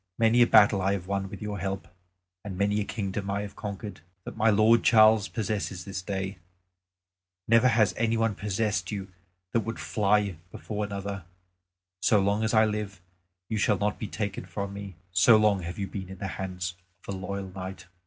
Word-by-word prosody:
Many 115 +1 +4
a 120 - +6
battle 100 -1 +6
I 95 +1 +2
have 95 -3 -3
won 100 0 -2
with 100 +1 -8
your 105 -1 -4
help; 95 +1 -3 0.6
and 95 -3 -6
many 100 +2 +1
a - - -2
kingdom 100 -2 -4
have 100 - 0 0.2
I - - -22
conquered, 100 -4 -7 0.2
that - - -8
my 110 0 +3
lord 110 +2 +5
Charles 110 -2 +6
possesses 100 -5 -3
this 95 -1 -5
day. 95 0 -4 1.1
Never 115 +2 +5
has 110 -5 +3
any 115 0 +1
one 115 -1 +1
possessed 100 -2 -1
you 100 -2 -5 0.4
that 115 - +2
would 115 +1 -4
fly 100 -3 +1
before 105 -1 -4
another. 100 -2 -5 0.8
So 105 +3 +4
long 100 +2 +1
as 110 - +1
I 110 0 +6
live, 105 -3 -3 0.5
you 110 - -2
shall 105 0 +3
not 105 +2 -1
be 110 - -4
taken 100 -3 -4
from 100 +2 -4
me, 100 -2 -8 0.2
so 95 +5 +6
long 105 -3 +3
have 85 +1 -6
you 100 - -2
been 95 -1 -7
in 95 - -8
the 95 +1 -4
hands 90 -2 -4 0.3
of 100 - -3
a - - -4
loyal 95 +1 -4
knight." 95 0 -7
100 Hz, 195 wpm, -27 LUFS, 95-110 Hz, 1.1 s, a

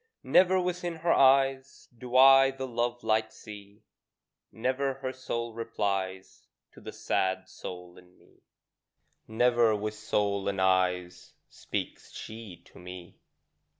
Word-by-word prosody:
Never 185 0 +4
within 180 -1 -3
her 165 +1 +1
eyes 135 0 +2
Do 125 +1 -8
I 135 0 +8
the 135 0 -6
love 120 -1 -3
light 110 0 +1
see; 105 -1 -13 0.7
Never 130 +3 -1
her 130 -1 -5
soul 115 -3 -5
replies 100 -4 -4 0.2
To - - -16
the - - -8
sad 95 0 -1
soul 90 -1 -10
in 90 0 -22
me: - - -26 0.9
Never 120 0 +3
with 105 +1 -3
soul 105 -2 -1
and 100 -1 -2
eyes 90 -1 0 0.2
Speaks - - -6
she 110 -6 -10
to - - -17
me. 90 -1 -11
110 Hz, 125 wpm, -28 LUFS, 95-130 Hz, 0.9 s, I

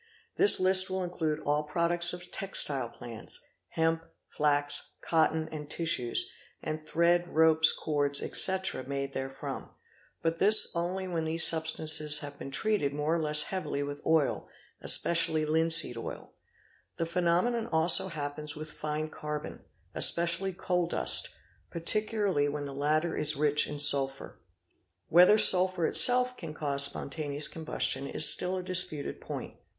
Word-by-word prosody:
This 410 - +5
list 185 0 +4
will 185 0 -4
include 160 -3 -5
all 145 +1 -2
products 170 +3 0
of 180 0 -9
textile 140 -10 -2
plants,—hemp, 160 +8 -6 0.2
flax, 145 -1 -2
cotton, 160 -1 -2
and 150 -2 -10
tissues, 160 -9 -3 0.3
and 155 0 -8
thread, 175 +2 0
ropes, 160 -1 +3
cords, 145 -2 -1
etc., 190 -7 0
made 140 0 -6
therefrom; 135 0 -8 0.5
but 165 0 -3
this 210 -1 +6
only 180 +3 -5
when 165 -3 -5
these 160 +1 +3
substances 155 -2 +2
have 145 -1 -8
been - - -9
treated 145 -3 -2
more 150 +2 -3
or 170 - -2
less 150 -1 +2
heavily 150 -5 -6
with 145 0 -8
oil, 160 -4 -2 0.3
especially 160 -2 +4
linseed 160 -3 +3
oil 115 - -10 0.6
"8", - - -47
The 165 - -3
phenomenon 180 +7 -2
also 165 +1 +6
happens 150 -2 -6
with 155 +1 -10
fine 155 0 -6
carbon, 150 -1 -9 0.3
especially 170 +3 +3
coal 180 -1 -3
dust, - - +1 0.4
particularly 200 -3 -1
when 145 0 -7
the 140 - -9
latter 155 +4 -2
is 150 0 -1
rich 150 +1 +1
in 150 - -8
sulphur. 140 -2 +2 0.7
Whether 180 +5 +4
sulphur 185 -4 +5
itself 250 +5 +4
can 155 -3 -9
cause 140 -2 +1
spontaneous 145 +1 -3
combustion 145 -4 -2
is 150 - +4
still 180 +5 +1
a 185 - -7
disputed 180 -5 -2
point. - - -9
160 Hz, 140 wpm, -27 LUFS, 145-175 Hz, 0.7 s, this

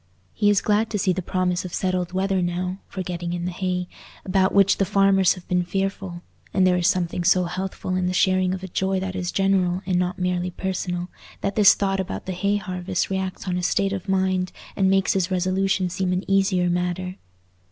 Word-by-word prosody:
He 205 - +2
is 205 -2 +3
glad 215 +1 +1
to 210 - -1
see 185 -1 +1
the 185 - -3
promise 180 0 -1
of 185 - -5
settled 185 -2 -1
weather 190 0 0
now, 180 +2 -2
for 190 - -5
getting 175 -1 -4
in 175 0 -3
the 180 - -2
hay, 180 0 -2 0.4
about 190 0 +2
which 200 -1 +4
the - - +2
farmers 195 -1 +3
have 180 - -13
been 180 0 +2
fearful; 190 -1 -3 0.3
and 190 -1 +4
there 180 -1 +4
is 175 0 +2
something 175 -1 0
so 185 +1 +4
healthful 185 +1 -3
in 185 -1 0
the - - 0
sharing 185 0 +2
of 190 - -9
a - - -4
joy 190 +1 0
that 190 0 -4
is 180 -1 -2
general 190 -1 +1
and 180 -1 +1
not 180 0 -1
merely 180 -1 -1
personal, 180 -1 -3 0.3
that 200 - -2
this 210 -2 +7
thought 195 -1 0
about 190 - -4
the 190 - -3
hay 200 +3 0
harvest 185 -1 -3
reacts 190 0 -3
on 180 -1 0
his 180 - 0
state 195 0 +1
of 195 0 -5
mind 190 -1 +1 0.2
and 190 -1 +2
makes 195 +3 +3
his 190 -2 0
resolution 185 +1 +1
seem 185 +1 -1
an 180 +1 -1
easier 195 -2 +2
matter. 180 +1 -2
185 Hz, 215 wpm, -23 LUFS, 180-195 Hz, 0.4 s, this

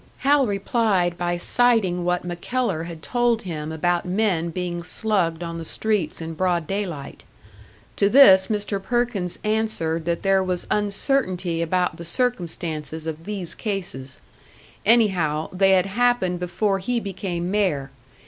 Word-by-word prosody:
Hal 280 -2 +4
replied 200 -3 +1
by 175 0 -1
citing 200 -3 +2
what 180 0 0
MacKellar 175 0 -2
had 165 -2 -9
told 240 -2 +1
him 160 -4 -5
about 175 +2 0
men 180 -3 0
being 175 0 -3
slugged 175 -3 -1
on 165 0 -5
the - - -5
streets 205 -1 -1
in 165 0 -5
broad 175 0 0
day 195 +4 -2
light. 145 -5 -8 0.7
To 200 - +3
this 195 -7 +7
Mr. 205 -2 -2
Perkins 235 -5 0
answered 210 -7 -1
that 170 0 -1
there 195 -1 +3
was 180 -1 -2
uncertainty 200 - 0
about 180 +2 0
the 170 - -8
circumstances 165 -7 -2
of 160 0 -5
these 200 -5 -4
cases; 175 - -5 0.7
anyhow, 180 -10 +3
they 195 +1 +4
had 185 -1 +4
happened 200 -4 +1
before 195 +3 0
he 240 +5 -1
became 185 -3 -4
mayor. 155 -10 0
185 Hz, 140 wpm, -23 LUFS, 170-210 Hz, 0.7 s, this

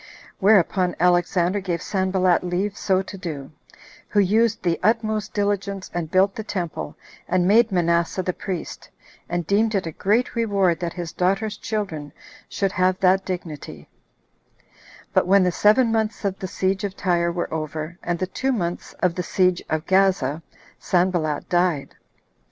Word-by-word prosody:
Whereupon 190 -2 +3
Alexander 175 +2 +2
gave 180 -3 -2
Sanballat 185 -2 +1
leave 185 +3 -1
so 190 -1 +1
to 195 - -9
do, 150 -6 -6 0.6
who 205 - +2
used 220 +3 +2
the 170 -2 +1
utmost 215 0 0
diligence, 200 -1 -2
and 170 -3 -3
built 190 +3 +3
the 220 - -5
temple, 175 -7 -4 0.3
and 180 0 +2
made 220 +2 +5
Manasseh 170 0 +1
the 180 - -1
priest, 180 -2 -6 0.4
and 175 -1 -2
deemed 215 +4 +2
it 190 - 0
a 165 - -4
great 210 +9 0
reward 200 -7 +1
that 170 -1 -3
his 175 -3 -5
daughter's 195 +4 0
children 190 -11 -4 0.4
should 195 -1 -1
have 185 -1 +1
that 190 +1 +3
dignity; 155 - -6 1.3
but - - +3
when 195 0 +5
the 180 - +2
seven 220 +6 +4
months 220 -1 -1
of 195 -1 -1
the 190 - -4
siege 190 +2 -1
of 200 -1 -4
Tyre 170 -2 +1
were 175 -1 -3
over, 155 +2 -4
and 175 0 -2
the 185 - -1
two 260 +8 -2
months 175 -8 -3
of 180 -2 +3
the 180 - -3
siege 180 0 +1
of 155 0 -1
Gaza, 185 -6 +2 0.4
Sanballat 175 -5 0
died. 175 -5 0
185 Hz, 155 wpm, -23 LUFS, 175-200 Hz, 1.3 s, made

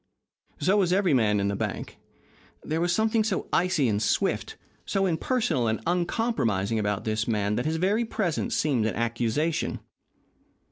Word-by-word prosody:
So 195 +3 +3
was 185 -4 +2
every 185 -4 +3
man 105 -5 +3
in 100 - 0
the 100 - -1
bank. - - -4 0.6
There 160 +2 -2
was 175 0 +1
something 220 +3 +2
so 220 - -2
icy 170 -7 +2
and 105 -2 0
swift, 105 - 0 0.3
so 195 -1 0
impersonal 170 - 0
and 110 0 0
uncompromising 170 - 0
about 105 -1 -1
this 110 0 -1
man 105 -3 0
that 125 +6 -1
his 160 - 0
very 200 +7 +1
presence 200 -7 -1
seemed 130 -8 +1
an 110 - -2
accusation. 120 +7 -1
150 Hz, 155 wpm, -26 LUFS, -, 0.6 s, So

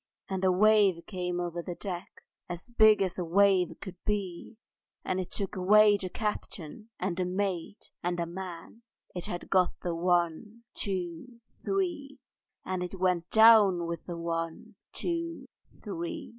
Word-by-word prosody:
And 190 -1 -3
a 185 - +4
wave 200 -2 +4
came 180 -2 -3
over 175 -1 -3
the 175 0 -6
deck, 180 -2 -7 0.3
As 175 +7 -7
big 215 -3 +6
as 185 -1 -3
a - - 0
wave 180 -1 +3
could 185 -3 -8
be, 200 0 -3 0.5
And 185 - -1
it 185 - -4
took 200 -1 -3
away 205 +3 +6
the 190 -2 -3
captain 210 -1 -5
and 180 -1 -1
the 185 - +1
mate 190 +1 -3
and 175 0 -2
a 170 - 0
man: 180 +4 -8 0.3
It 180 - -5
had 175 - -6
got 185 -2 +2
the 175 - -1
One, 175 +6 0
Two, 190 +4 -4 0.2
Three! 335 -8 -2 0.5
And 185 -1 -2
it 180 +1 -5
went 180 -2 +1
with 195 -7 +6
the 175 -2 -5
One, 165 -1 -4 0.2
Two, 335 -1 -3 0.4
Three! 335 -3 -5
185 Hz, 150 wpm, -29 LUFS, 175-210 Hz, 0.5 s, big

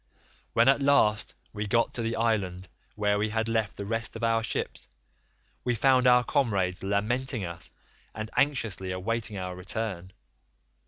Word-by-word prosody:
"When 115 +2 +4
at 135 +1 +5
last 110 -7 +3 0.2
we 105 -1 -3
got 115 +3 +2
to 120 - -3
the 115 0 -1
island 100 -6 0 0.3
where 105 -1 +1
we 110 +1 0
had 110 +1 -1
left 110 -3 -1
the 100 - -4
rest 115 +2 -3
of 115 - -6
our 115 0 +3
ships, 115 - -2 0.8
we 125 -1 +1
found 130 +2 +4
our 125 0 +6
comrades 100 -10 0
lamenting 110 +4 -1
us, 85 0 -7 0.5
and 110 +1 -5
anxiously 115 -10 +1
awaiting 105 +3 -2
our 90 -1 -4
return. 95 -1 -4
110 Hz, 155 wpm, -28 LUFS, 100-115 Hz, 0.8 s, our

